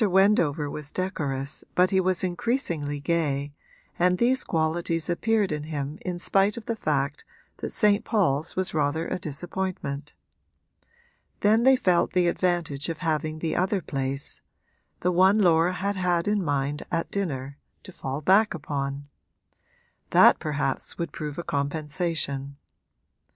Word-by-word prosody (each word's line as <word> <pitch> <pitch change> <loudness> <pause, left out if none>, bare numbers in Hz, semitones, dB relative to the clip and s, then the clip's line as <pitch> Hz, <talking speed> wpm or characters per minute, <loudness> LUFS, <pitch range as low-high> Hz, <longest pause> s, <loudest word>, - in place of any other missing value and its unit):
Wendover 185 -7 +3
was 145 0 -6
decorous 145 -7 -3
but 180 +2 +4
he 190 - +3
was 185 -1 +1
increasingly 175 - -1
gay, 145 -3 -1 0.5
and 180 +1 +3
these 250 +4 +2
qualities 165 +1 0
appeared 215 +2 +1
in 150 -1 -3
him 150 -1 -4
in 180 -1 -3
spite 195 +4 +2
of 230 - -7
the 230 - -2
fact 145 -6 -1 0.3
that - - -4
St. 210 -2 +2
Paul's 165 - 0
was 185 0 -1
rather 155 +1 0
a - - -3
disappointment. 155 -2 -4 1.3
Then 215 +2 +4
they 265 +2 +6
felt 180 -8 +2
the 180 -1 +3
advantage 170 -5 0
of 165 - -3
having 155 0 -1
the 160 0 -2
other 190 +2 +1
place 135 -3 -3 0.6
the 180 - +2
one 190 +4 +5
Laura 175 -3 +4
had 200 +2 -2
had 175 -1 +1
in 205 -2 +1
mind 145 -1 -1
at 165 -1 -1
dinner 140 -8 -3 0.2
to 190 - -10
fall 135 -4 -5
back 195 +5 +4
upon: 140 -2 -4 1.0
that - - +6
perhaps 145 -3 -2
would 170 -1 -3
prove 150 -2 -5
a 170 - -3
compensation. 145 -1 -2
165 Hz, 140 wpm, -26 LUFS, 145-185 Hz, 1.3 s, they